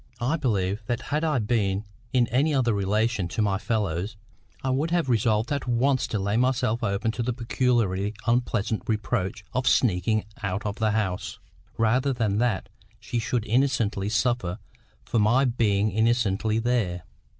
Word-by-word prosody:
I 125 +7 +1
believe 105 - 0
that 120 - -1
had 150 +2 +1
I 155 -4 +1
been 105 -3 0 0.3
in 125 -2 +3
any 145 +5 +2
other 120 -4 +2
relation 105 0 0
to 85 - -2
my 100 -1 +1
fellows, 105 -2 -2 0.5
I 130 - 0
would 145 +5 0
have 170 -5 +1
resolved 110 +1 +2
at 140 -2 -2
once 130 +2 +2
to 110 - -2
lay 100 +2 0
myself 125 -2 +1
open 105 +2 0
to 120 - -4
the 120 +1 -1
peculiarly 115 -4 0
unpleasant 115 -3 0
reproach 105 -1 -2
of 130 0 -1
sneaking 110 -1 +2 0.2
out 100 0 -2
of 105 -1 -3
the 110 -1 +1
house, 95 -5 -2 0.4
rather 125 +5 +2
than 110 -4 0
that 115 -5 0 0.3
she 120 - -3
should 115 0 -1
innocently 110 -5 +1
suffer 110 -4 0 0.5
for 115 - 0
my 115 +6 +4
being 110 -4 +1
innocently 110 -1 +1
there. 115 -7 0
115 Hz, 160 wpm, -26 LUFS, 100-125 Hz, 0.5 s, my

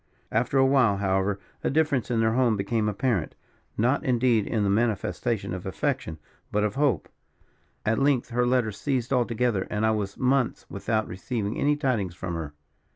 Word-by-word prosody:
"After 120 +5 +1
a 135 - +6
while, 130 -7 +4
however, 95 0 0 0.2
a - - +1
difference 140 -5 +1
in 115 -2 +1
their 110 0 +2
tone 120 -2 +3
became 105 +2 0
apparent. 105 -5 -1 0.4
Not, 125 +8 +2
indeed, 120 -5 +2
in 110 -3 0
the 100 - +1
manifestation 110 -1 0
of 90 -1 -5
affection, 130 - -2 0.3
but 105 0 +1
of 105 -1 0
hope. 135 - +1 0.8
At 115 +1 +2
length 135 -4 +2
her 120 +1 +1
letters 120 -5 +1
ceased 130 -3 -1
altogether; 120 -4 +1
and 105 +1 0
I 110 - +3
was 105 -2 -2
months 130 -1 +1
without 110 +2 -1
receiving 105 +3 -3
any 145 +1 +3
tidings 120 - -1
from 85 -1 -5
her. 80 -3 -5
115 Hz, 170 wpm, -26 LUFS, 100-130 Hz, 0.8 s, a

